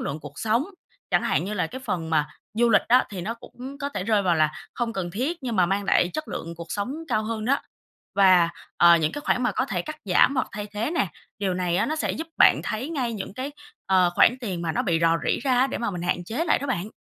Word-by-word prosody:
lượng 155 - -4
cuộc 145 0 -10
sống, 225 +5 +1 0.5
chẳng - - +3
hạn - - +1
như 205 +3 -3
là 180 -5 0
cái 260 +10 -8
phần 165 -6 -3
mà 150 -2 +2 0.3
du 235 +2 +3
lịch 210 - +5
á 250 +2 +5
thì 195 -3 -5
nó 215 +6 -3
cũng 255 +3 -10
có 280 -1 -2
thể 235 -10 -4
rơi 215 -1 +2
vào 180 -3 +2
là 155 -1 +2 0.2
không 235 -2 -2
cần 185 -4 -3
thiết, 265 - -2
nhưng 235 -5 -2
mà 180 - +4
mang 195 +3 0
lại 180 -2 +3
chất 310 -1 -4
lượng 170 +1 -5
cuộc 170 0 -7
sống 205 +6 -2
cao 215 0 +1
hơn 220 -1 -3
đó, 275 +4 +2 0.6
và, 185 -3 +6 0.3
ờ, 170 0 +7
những 155 -2 0
cái 290 - -5
khoản 250 - +1
mà 245 - +1
có 260 - 0
thể - - -2
cắt 310 0 -7
giảm 190 +8 +4
hoặc 255 - 0
thay 210 -2 -5
thế 210 +7 -3
nè, 345 - 0 0.3
điều 195 -3 0
này 180 -1 0
á - - +2
nó 310 - -2
sẽ - - -1
giúp 325 - -5
bạn - - +6
thấy 255 +9 -3
ngay 255 -7 -1
những 200 -2 -6
cái, 265 +4 -5 0.3
ờ, 185 -2 +4
khoản 245 - +6
tiền 185 -7 -4
mà 165 -2 -1
nó - - 0
bị 170 -3 +1
rò 165 0 +4
rỉ - - +1
ra 255 -3 +3
á, 260 - +4
để - - -4
mà 235 -3 -1
mình 175 -2 -5
hạn 175 0 -1
chế 230 - -2
lại - - +3
đó 280 - -5
bạn. 215 -5 -2
210 Hz, 275 wpm, -25 LUFS, 175-255 Hz, 0.6 s, ờ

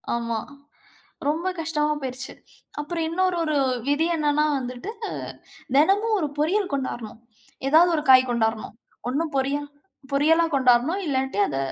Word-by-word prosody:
ஆமா. 230 -1 -2 0.9
ரொம்ப 320 +5 0
கஷ்டமா 300 -1 0
போயிருச்சு. 255 -1 -5 0.5
அப்பறம் 330 +2 -3
இன்னொரு 370 +2 +1
ஒரு 310 -2 -1 0.3
விதி 290 +3 +2
என்னன்னா 300 -1 +2
வந்துட்டு, 250 - -5 0.9
தெனமும் 410 +8 +3
1 305 -4 -1
பொரியல் 370 +5 +1
கொண்டாரணும். 240 -5 -4 0.5
ஏதாவது 335 +4 +6
1 300 - -1
காய் 255 0 +6
கொண்டாரணும். 225 -2 -1 0.3
ஒண்ணு 290 +6 0
பொரியல் 280 +2 -1 0.5
பொரியலா 320 +4 +4
கொண்டாரணும், 260 +8 +3
இல்லாட்டி 265 -6 -1
அத 135 - -3
295 Hz, 125 wpm, -24 LUFS, 255-325 Hz, 0.9 s, ஏதாவது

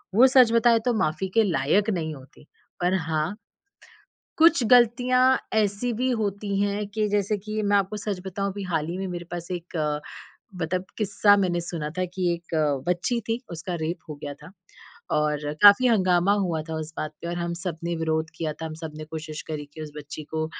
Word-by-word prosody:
वो 255 +5 +8
सच 255 -3 +6
बताएँ 230 0 +5
तो 245 - +2
माफ़ी 155 +5 -1
के 225 - +6
लायक 170 +9 +2
नहीं 160 -5 -2
होती। 135 +2 -16 0.3
पर 180 +1 +2 0.2
हाँ 155 +5 -1 1.0
कुछ 325 -4 +6
गलतियाँ 245 +2 +4 0.4
ऐसी 215 +3 +1
भी 255 +1 +1
होती 200 -1 -2
हैं 205 +1 0
कि 215 -1 +1
जैसे 205 0 +1
कि 215 +2 -4
मैं 205 0 +3
आपको 200 +1 0
सच 200 -2 -3
बताऊँ 195 +1 -2
अभी 200 +1 -6
हाल 155 -2 0
ही 175 - -3
में 195 - -3
मेरे 175 -1 -5
पास 175 0 -6
एक 175 -1 -5
अ, 150 -1 0 0.6
मतलब 180 +3 -1
किस्सा 205 -1 +4
मैंने 180 -3 +1
सुना 165 -3 -4
था 185 - +1
कि 180 -2 +1
एक 170 0 -6 0.3
बच्ची 205 +7 0
थी 225 +2 0
उसका 175 +2 -5
रेप 165 +3 -2
हो 155 - -5
गया 145 -1 -5
था। - - -11 0.7
और 150 -1 0 0.2
काफ़ी 205 +5 +8
हँगामा 185 -3 +3
हुआ 160 -3 -2
था 160 - -3
उस 155 +1 -7
बात 155 0 -3
पे 170 - -4
और 175 - -3
हम 170 0 -2
सब 175 -4 -3
ने 170 0 -1
विरोध 160 0 -1
किया 155 -2 -2
था, 160 +2 -7
हम 155 - -6
सब 160 -1 -5
ने 155 - -6
कोशिश 155 0 -7
करी 150 -2 -4
कि 155 - -7
उस 150 -1 -8
बच्ची 150 +1 -8
को 155 0 0
180 Hz, 205 wpm, -25 LUFS, 160-210 Hz, 1.0 s, वो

